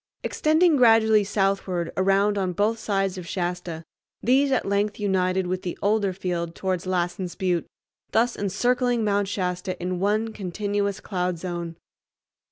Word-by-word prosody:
Extending 315 +1 +3
gradually 225 -3 +5
southward 195 -3 -1
around 195 +2 +2
on 190 -3 -1
both 215 +5 +1
sides 195 -3 -1
of 175 - -9
Shasta, 175 -3 -3 0.4
these 270 +3 +3
at 260 - +1
length 200 +2 0
united 190 -2 +1
with 185 +1 -2
the 175 - -5
older 205 -1 +1
field 175 -3 -3
towards 185 -1 -2
Lassen's 180 0 -2
Butte, 180 -4 -1 0.4
thus 235 +2 +2
encircling 245 +4 +1
Mount 205 -1 +1
Shasta 180 -2 -3
in 180 0 -2
one 215 +3 0
continuous 200 +1 -2
cloud 180 -3 -2
zone. 170 -1 -5
195 Hz, 140 wpm, -25 LUFS, 180-210 Hz, 0.4 s, gradually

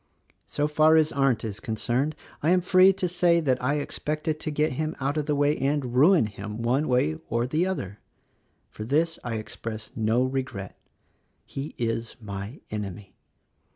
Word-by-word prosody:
"So 145 0 0
far 155 +1 +5
as 155 -1 +4
Arndt 135 -5 +1
is 110 -1 -5
concerned, 120 +7 -1 0.3
I 155 - +2
am 180 0 +4
free 185 +1 +6
to 190 -1 -1
say 175 -1 +3
that 130 -6 0
I 140 +3 +2
expected 155 +1 -2
to 155 - -2
get 150 +1 +1
him 155 +4 -2
out 140 +2 -1
of 150 -1 -1
the 150 - +1
way 145 +1 +3
and 135 -3 -1
ruin 155 - +5
him, 105 +2 -6
one 130 +6 +1
way 80 -12 +1
or 115 +1 +1
the 155 +8 0
other; 105 - -4 0.4
— - - -43
for 105 - -7
this 160 +8 +1
I 120 -2 -3
express 110 0 -6
no 115 +2 +2
regret. 130 -8 -3 0.7
He 140 +2 -6
is 115 -1 -2
my 100 +3 -7
enemy. 100 -2 -6
135 Hz, 175 wpm, -26 LUFS, 115-155 Hz, 0.7 s, free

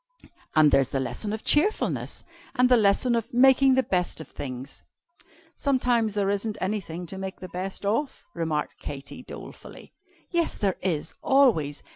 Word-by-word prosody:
And 155 -2 +6
there's 135 -2 +3
the 135 - -1
lesson 130 - -3
of 220 0 -4
Cheerfulness. 360 +9 +1 0.3
And 250 0 +4
the 250 - +7
lesson 220 +3 +3
of 230 +2 -1
Making 265 +1 +5
the 260 - +3
Best 180 -6 -1
of 160 - -8
Things." 130 0 -7 0.7
"Sometimes 245 -6 +1
there 200 -1 +1
isn't 205 +1 -2
anything 185 -3 -3
to 190 +3 -7
make 190 0 -6
the 185 - -7
best 190 +3 -5
of," 230 +8 -1
remarked 160 -3 -2
Katy, 140 - -7
dolefully. - - -11 0.4
"Yes 340 -2 0
there 195 -3 0
is, 165 -5 -2
always! 215 - +3
200 Hz, 155 wpm, -26 LUFS, 160-250 Hz, 0.7 s, the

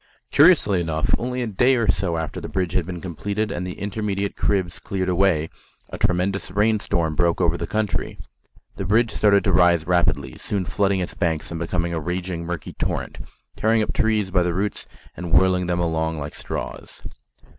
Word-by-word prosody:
Curiously 145 - +5
enough, 80 -2 -1
only 125 +1 -2
a - - -2
day 120 +6 +3
or 115 -3 0
so 85 -2 -1
after 80 -1 -4
the - - -6
bridge 90 -3 -1
had 90 -3 0
been 90 -2 -6
completed 100 +4 -3
and 90 0 -3
the 90 - -6
intermediate 100 -1 -2
cribs 95 -4 0
cleared 95 -2 -2
away, 90 -4 +2 0.4
a - - -6
tremendous 90 0 0
rain 105 +3 +2
storm 80 -5 0
broke 85 +2 +1
over 85 -2 +2
the 85 0 -4
country. 105 -3 -2 0.6
The - - -3
river 110 +2 +3
started 100 -1 +4
to 95 - +1
rise 85 -2 +4
rapidly, 90 0 0
soon 100 -3 -2
flooding 100 0 +1
its 90 - -4
banks 80 -4 -1
and 85 - -4
becoming 85 0 -1
a 80 - -1
raging 90 0 -4
murky 85 -3 -5
torrent, - - -3 0.4
tearing 110 0 +2
up - - -3
trees 105 -3 +1
by 90 -1 +3
the 90 -1 0
roots 100 +2 -2 0.3
and 85 -1 -6
whirling 90 +1 +4
them 90 0 0
along 80 -1 -1
like 75 0 -5
straws. - - -7
90 Hz, 190 wpm, -23 LUFS, 85-100 Hz, 0.6 s, Curiously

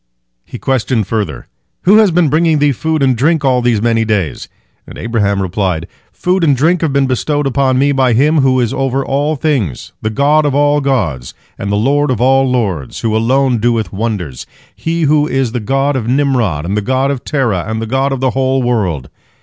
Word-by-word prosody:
He - - -9
questioned 125 -4 -1
further, 100 -7 -3 0.4
"Who 200 +4 +5
has 215 -2 +5
been 175 -1 +2
bringing 160 +2 +2
thee 145 0 +2
food 155 +3 -1
and 130 -2 +3
drink 150 +4 +1
all 130 -2 +2
these 120 -3 +1
many 115 -1 +2
days?" 105 -8 -2 0.4
and - - -11
Abraham 100 -4 -1
replied: 90 -3 -2 0.3
"Food 180 0 -1
and 145 -5 +3
drink 165 +6 +2
have 160 -3 0
been 140 0 +2
bestowed 145 +3 -1
upon 135 -1 +1
me 140 +2 +2
by 130 -3 +2
Him 150 +6 +3
who 130 -1 +2
is 120 -3 0
over 135 0 -1
all 145 +3 0
things, 130 - -2
the 110 - -1
God 145 +7 +2
of 145 -2 0
all 145 0 +2
gods 95 - -2 0.2
and 100 - -4
the - - +1
Lord 140 +7 +1
of 125 -4 -1
all 135 +1 +3
lords, 100 - -2
who 110 -1 0
alone 125 +2 +1
doeth 115 -4 0
wonders, 95 - -4 0.3
He 165 +10 -2
who 150 0 +2
is 135 -4 -1
the 125 - -2
God 135 +6 0
of 120 -4 -2
Nimrod 125 - 0
and 95 +4 -2
the 105 - 0
God 130 +5 0
of 135 -3 -5
Terah 120 - -1
and 110 0 -3
the 115 - -3
God 135 +4 0
of 135 -2 -3
the 130 -1 +1
whole 130 0 0
world. 95 - -1
130 Hz, 205 wpm, -14 LUFS, 110-140 Hz, 0.4 s, Who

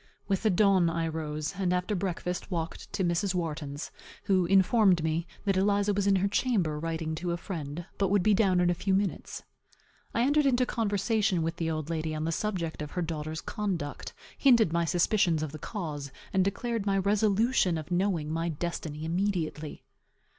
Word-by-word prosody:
With 195 -1 0
the 220 - +3
dawn 190 -2 +4
I 165 0 -1
rose; 155 -1 -3
and 185 -2 +1
after 180 +3 0
breakfast 180 -1 -3
walked 165 -3 -4
to 200 -1 0
Mrs. 180 +2 0
Wharton's, 150 -4 -4 0.3
who 185 -3 +2
informed 195 -2 +4
me, 160 +1 -1 0.2
that 195 -2 +2
Eliza 205 +1 +2
was 200 0 0
in 200 - +5
her 190 +1 +2
chamber, 195 -9 0
writing 160 0 -3
to 170 +2 -2
a - - -2
friend, 165 -3 -5
but 195 -2 +2
would 200 -2 +3
be 215 - +4
down 190 -3 +3
in 175 0 +3
a - - +2
few 190 +2 0
minutes. 195 -1 -2 0.7
I 235 - +3
entered 290 +2 +3
into 250 -1 +3
conversation 205 -5 0
with 165 +1 -2
the 165 -2 -1
old 155 0 -3
lady 160 -1 -2
on 155 - -3
the 165 - 0
subject 170 -4 -2
of 150 - -4
her 180 - -1
daughter's 155 -1 -4
conduct; 185 -9 -4 0.2
hinted 235 - +4
my 170 0 +2
suspicions 175 0 +2
of 155 - -4
the 155 - -8
cause, 150 -8 -5 0.2
and 190 - +4
declared 210 +2 -2
my 195 0 +2
resolution 205 -1 +2
of 155 +2 -7
knowing 175 -4 0
my 165 +1 -1
destiny 160 -1 -4
immediately. 165 -4 -2
180 Hz, 185 wpm, -29 LUFS, 160-200 Hz, 0.7 s, in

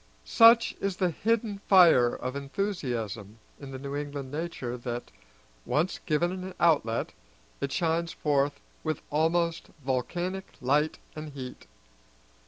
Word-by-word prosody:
Such 230 0 +6
is 195 -2 -1
the 180 -3 +1
hidden 220 +2 0
fire 170 -10 +7
of 130 +1 -5
enthusiasm 125 - -3 0.2
in 140 - -9
the 135 - -6
New 140 +1 -5
England 145 -2 -5
nature 150 -6 -4
that, 120 0 -5 0.5
once 165 +5 0
given 170 +3 +2
an 185 0 -6
outlet, 145 -9 +2 0.5
it 140 - -2
shines 165 0 0
forth 145 -1 0 0.2
with 155 -1 -2
almost 165 +2 +1 0.2
volcanic 175 +9 -2
light 145 +4 +1 0.2
and 155 -1 -7
heat. 130 -2 -8
150 Hz, 125 wpm, -28 LUFS, 135-175 Hz, 0.5 s, fire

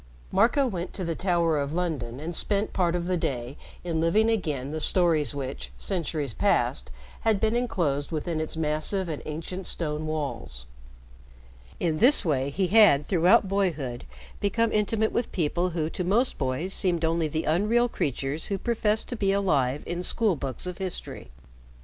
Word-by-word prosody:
Marco 260 +5 +3
went 185 -8 -4
to 185 - -3
the 165 - -1
Tower 170 -3 +1
of 140 +1 -2
London 145 -9 -2
and 165 +4 -5
spent 200 +4 +1
part 175 -2 +1
of 175 -1 -2
the 180 0 0
day 125 -4 -3 0.3
in 165 -2 -1
living 215 +7 +3
again 150 - -2
the 155 - -3
stories 160 -3 +1
which, 135 -1 -5
centuries 155 - -2
past, - - +1 0.3
had 220 -3 +2
been 220 +2 +1
inclosed 165 - -1
within 160 0 -2
its 160 0 -4
massive 160 +5 0
and 155 -3 -4
ancient 165 +4 -5
stone 155 -2 -2
walls. 140 - -4 1.1
In 160 -3 0
this 255 -3 +6
way, 140 -4 +1
he 185 +7 0
had 200 -10 +6
throughout 180 +3 +4
boyhood 160 -11 -1 0.3
become 230 +3 +1
intimate 215 +1 +1
with 240 - -2
people 175 +2 0
who 160 -3 -2
to 180 - -3
most 220 +8 +1
boys 140 +8 -2
seemed 170 -3 0
only 165 0 +1
the 155 +1 -2
unreal 210 +9 +2
creatures 140 - -1
who 200 - -1
professed 220 0 0
to 245 - -3
be 195 -3 +1
alive 150 -9 +1
in 175 +1 -3
school 210 +1 +2
books 135 0 -4
of 180 -1 -5
history. 185 -2 -5
170 Hz, 170 wpm, -26 LUFS, 150-195 Hz, 1.1 s, this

